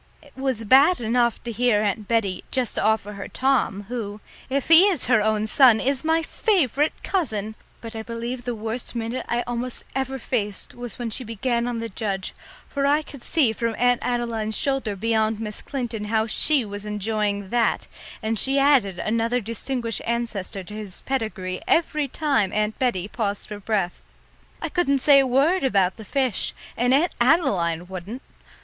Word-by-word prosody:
It 285 Hz, -, -20 dB
was 260 Hz, -4 st, -2 dB
bad 275 Hz, -, +6 dB
enough 235 Hz, 0 st, +1 dB
to 235 Hz, -, -4 dB
hear 230 Hz, -2 st, +2 dB
Aunt 210 Hz, 0 st, -1 dB
Bettie 205 Hz, -6 st, 0 dB
just 255 Hz, -3 st, -1 dB
offer 215 Hz, -1 st, +1 dB
her 200 Hz, -1 st, -7 dB
Tom, 255 Hz, -7 st, 0 dB
who, 215 Hz, -2 st, -5 dB, 0.3 s
if 275 Hz, 0 st, -1 dB
he 330 Hz, +4 st, +8 dB
is 365 Hz, -9 st, +1 dB
her 230 Hz, -3 st, +4 dB
own 215 Hz, 0 st, +1 dB
son, 235 Hz, 0 st, +6 dB
is 270 Hz, +3 st, 0 dB
my 320 Hz, +1 st, +2 dB
favourite 310 Hz, -, 0 dB
cousin, 220 Hz, -, -1 dB, 0.3 s
but 230 Hz, 0 st, -8 dB
I 220 Hz, -, -4 dB
believe 235 Hz, +2 st, -5 dB
the 245 Hz, 0 st, -3 dB
worst 225 Hz, +3 st, -4 dB
minute 230 Hz, +2 st, -3 dB
I 240 Hz, 0 st, 0 dB
almost 245 Hz, +1 st, -3 dB
ever 265 Hz, 0 st, -2 dB
faced 210 Hz, -5 st, -3 dB
was 245 Hz, -3 st, -7 dB
when 235 Hz, -2 st, -4 dB
she 255 Hz, -, -2 dB
began 235 Hz, +1 st, -1 dB
on 240 Hz, -1 st, -2 dB
the 230 Hz, 0 st, -3 dB
judge, 195 Hz, -3 st, -3 dB, 0.3 s
for 280 Hz, -1 st, -1 dB
I 295 Hz, +2 st, +3 dB
could 280 Hz, -4 st, -12 dB
see 275 Hz, -9 st, +2 dB
from 230 Hz, 0 st, -2 dB
Aunt 245 Hz, 0 st, +3 dB
Adeline's 230 Hz, -3 st, -1 dB
shoulder 270 Hz, -7 st, -1 dB
beyond 220 Hz, +1 st, 0 dB
Miss 210 Hz, -2 st, -4 dB
Clinton 235 Hz, -6 st, -4 dB
how 220 Hz, +1 st, +1 dB
she 270 Hz, +3 st, +3 dB
was 205 Hz, 0 st, -6 dB
enjoying 210 Hz, -1 st, -2 dB
that, 240 Hz, -1 st, +1 dB, 0.4 s
and 220 Hz, 0 st, 0 dB
she 270 Hz, +5 st, +2 dB
added 270 Hz, -10 st, +3 dB
another 230 Hz, +4 st, 0 dB
distinguished 230 Hz, 0 st, -3 dB
ancestor 230 Hz, -5 st, -3 dB
to 195 Hz, -, -11 dB
his 210 Hz, -3 st, -4 dB
pedigree 215 Hz, -8 st, -3 dB
every 305 Hz, -3 st, +2 dB
time 275 Hz, -, +1 dB
Aunt 215 Hz, 0 st, -1 dB
Bettie 220 Hz, -8 st, 0 dB
paused 205 Hz, -2 st, -3 dB
for 210 Hz, -1 st, -7 dB
breath. 200 Hz, -4 st, -1 dB, 0.6 s
I -, -, -1 dB
couldn't 350 Hz, -6 st, +2 dB
say 275 Hz, +1 st, +6 dB
a 270 Hz, -, +3 dB
word 280 Hz, +9 st, +2 dB
about 195 Hz, -7 st, +2 dB
the 220 Hz, -, -10 dB
fish 260 Hz, -1 st, 0 dB, 0.2 s
and 245 Hz, +2 st, +1 dB
Aunt 310 Hz, +6 st, +3 dB
Adeline 195 Hz, -, +2 dB
wouldn't! 190 Hz, +8 st, -7 dB
230 Hz, 175 wpm, -23 LUFS, 210-265 Hz, 0.6 s, he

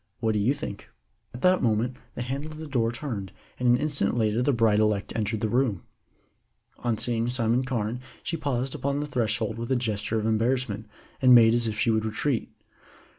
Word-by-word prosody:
What 110 Hz, -2 st, +1 dB
do 105 Hz, -, 0 dB
you 120 Hz, +8 st, +2 dB
think?" 120 Hz, -9 st, -7 dB, 0.4 s
At 120 Hz, -, -10 dB
that 185 Hz, 0 st, +4 dB
moment 115 Hz, +2 st, +1 dB, 0.2 s
the 120 Hz, -, -3 dB
handle 140 Hz, +5 st, -4 dB
of 155 Hz, -, -9 dB
the 160 Hz, -, -6 dB
door 120 Hz, -6 st, 0 dB
turned, 120 Hz, -6 st, -5 dB, 0.3 s
and 125 Hz, -1 st, +2 dB
an 120 Hz, -, +6 dB
instant 140 Hz, -6 st, -1 dB
later 110 Hz, 0 st, +1 dB
the 145 Hz, -, +3 dB
bride 115 Hz, -4 st, +3 dB
elect 105 Hz, -2 st, +1 dB
entered 110 Hz, 0 st, -1 dB
the 110 Hz, -, +1 dB
room. 120 Hz, -5 st, 0 dB, 1.0 s
On 120 Hz, -2 st, -1 dB
seeing 115 Hz, 0 st, 0 dB
Simon 120 Hz, 0 st, +1 dB
Carne 120 Hz, -2 st, -2 dB, 0.2 s
she 165 Hz, -, -2 dB
paused 135 Hz, -4 st, -2 dB
upon 140 Hz, +1 st, -1 dB
the 150 Hz, -, -2 dB
threshold 115 Hz, -3 st, -1 dB
with 115 Hz, +2 st, -4 dB
a -, -, +4 dB
gesture 110 Hz, -2 st, -1 dB
of 110 Hz, -, -1 dB
embarrassment, 110 Hz, -1 st, 0 dB, 0.3 s
and 130 Hz, -1 st, +8 dB
made 115 Hz, -1 st, +7 dB
as 120 Hz, -1 st, +1 dB
if 110 Hz, -1 st, -3 dB
she 115 Hz, -, +2 dB
would 110 Hz, -1 st, +1 dB
retreat. 115 Hz, +4 st, -1 dB
120 Hz, 200 wpm, -26 LUFS, 110-130 Hz, 1.0 s, and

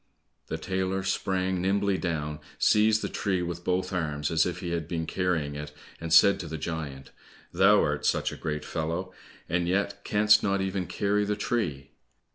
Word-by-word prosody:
The -, -, -3 dB
tailor 95 Hz, 0 st, -2 dB
sprang 95 Hz, -1 st, -1 dB
nimbly 100 Hz, 0 st, +1 dB
down, 75 Hz, -4 st, -3 dB, 0.2 s
seized 110 Hz, 0 st, +4 dB
the -, -, 0 dB
tree 95 Hz, -4 st, -1 dB
with 85 Hz, 0 st, -5 dB
both 90 Hz, +1 st, -1 dB
arms 75 Hz, -4 st, -2 dB
as 80 Hz, +1 st, +3 dB
if 90 Hz, -, -4 dB
he 90 Hz, -2 st, -4 dB
had 85 Hz, -3 st, -2 dB
been 80 Hz, -1 st, -2 dB
carrying 80 Hz, -5 st, -1 dB
it, 75 Hz, 0 st, -6 dB, 0.3 s
and 80 Hz, 0 st, -5 dB
said 100 Hz, +4 st, +7 dB
to 85 Hz, -, -5 dB
the 80 Hz, 0 st, -5 dB
giant, 75 Hz, -4 st, -5 dB, 0.4 s
"Thou -, -, +5 dB
art -, -, -1 dB
such -, -, +1 dB
a -, -, -6 dB
great 75 Hz, -1 st, -4 dB
fellow, 85 Hz, +3 st, -3 dB, 0.3 s
and 85 Hz, +1 st, 0 dB
yet 100 Hz, +2 st, -1 dB
canst 105 Hz, +1 st, +4 dB
not 100 Hz, -1 st, +1 dB
even 95 Hz, -1 st, -2 dB
carry 105 Hz, 0 st, 0 dB
the 105 Hz, 0 st, -1 dB
tree!" 85 Hz, -, -2 dB
90 Hz, 180 wpm, -27 LUFS, 80-100 Hz, 0.4 s, said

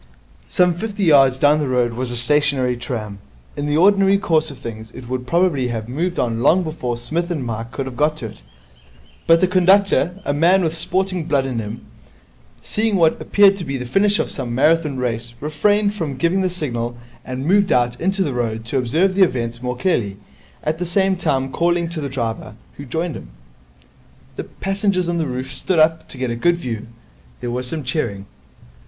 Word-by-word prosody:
Some 180 Hz, -1 st, +3 dB
fifty 205 Hz, +3 st, -4 dB
yards 135 Hz, -6 st, +5 dB
down 145 Hz, +3 st, +4 dB
the 150 Hz, -, -1 dB
road 125 Hz, -2 st, +1 dB
was 125 Hz, +1 st, -3 dB
a 120 Hz, -, -3 dB
stationary 140 Hz, -1 st, +1 dB
tram. 110 Hz, -5 st, -5 dB, 0.4 s
In 145 Hz, -, -3 dB
the 150 Hz, +1 st, +1 dB
ordinary 195 Hz, +2 st, +5 dB
course 160 Hz, -5 st, +1 dB
of 140 Hz, -, -9 dB
things 110 Hz, -2 st, -8 dB
it 125 Hz, -, -9 dB
would 125 Hz, 0 st, -4 dB
probably 170 Hz, -6 st, +2 dB
have 115 Hz, -2 st, -4 dB
moved 170 Hz, +8 st, -2 dB
on 115 Hz, -1 st, 0 dB
long 160 Hz, +9 st, +4 dB
before 140 Hz, -7 st, -3 dB
Psmith 165 Hz, +9 st, -2 dB
and 155 Hz, -7 st, -3 dB
Mike 115 Hz, 0 st, -5 dB
could 135 Hz, -, -4 dB
have 130 Hz, -2 st, -7 dB
got 150 Hz, +2 st, +1 dB
to 125 Hz, -, -6 dB
it; -, -, -14 dB, 0.9 s
but 165 Hz, 0 st, +5 dB
the 185 Hz, -, +4 dB
conductor, 185 Hz, -1 st, +3 dB
a 145 Hz, -, 0 dB
man 175 Hz, +6 st, +4 dB
with 160 Hz, -1 st, 0 dB
sporting 185 Hz, +1 st, -1 dB
blood 140 Hz, -3 st, +1 dB
in 125 Hz, -3 st, -2 dB
him, 110 Hz, +1 st, -6 dB, 0.8 s
seeing 220 Hz, -1 st, 0 dB
what 165 Hz, -4 st, +3 dB
appeared 200 Hz, -1 st, +5 dB
to 185 Hz, -, -5 dB
be 140 Hz, -3 st, -3 dB
the 125 Hz, -, -5 dB
finish 200 Hz, +10 st, +2 dB
of -, -, -1 dB
some 120 Hz, -4 st, -4 dB
Marathon 150 Hz, +1 st, +2 dB
Race, 120 Hz, -1 st, -3 dB
refrained 205 Hz, +8 st, +1 dB
from 155 Hz, -9 st, -4 dB
giving 170 Hz, +7 st, +1 dB
the 185 Hz, -, +1 dB
signal, 120 Hz, -9 st, -4 dB, 0.3 s
and 130 Hz, +1 st, -5 dB
moved 200 Hz, +3 st, +3 dB
out 120 Hz, -1 st, +1 dB
into 190 Hz, +2 st, +1 dB
the 145 Hz, -, -2 dB
road 115 Hz, -2 st, -2 dB
to 130 Hz, +3 st, -1 dB
observe 165 Hz, +10 st, +1 dB
events 120 Hz, -9 st, +1 dB
more 125 Hz, 0 st, -3 dB
clearly, 115 Hz, -, 0 dB, 0.5 s
at 155 Hz, +1 st, -1 dB
the -, -, -1 dB
same 190 Hz, +2 st, +2 dB
time 135 Hz, -7 st, -1 dB
calling 170 Hz, +2 st, +1 dB
to 165 Hz, -2 st, -5 dB
the 140 Hz, -, -3 dB
driver, 115 Hz, -5 st, -4 dB, 0.2 s
who 145 Hz, -, -8 dB
joined 165 Hz, +5 st, -3 dB
him. -, -, -9 dB, 1.3 s
Passengers 195 Hz, -2 st, 0 dB
on 170 Hz, -1 st, -1 dB
the 160 Hz, -, -1 dB
roof 130 Hz, +1 st, -5 dB
stood 185 Hz, -, -1 dB
up 160 Hz, +1 st, +3 dB
to -, -, -10 dB
get 130 Hz, -2 st, -2 dB
a -, -, -2 dB
good 175 Hz, +8 st, +2 dB
view. 115 Hz, -10 st, -5 dB, 0.5 s
There 120 Hz, -, -4 dB
was 125 Hz, +1 st, -3 dB
some 155 Hz, +3 st, -4 dB
cheering. 115 Hz, -8 st, -2 dB
150 Hz, 195 wpm, -20 LUFS, 125-175 Hz, 1.3 s, yards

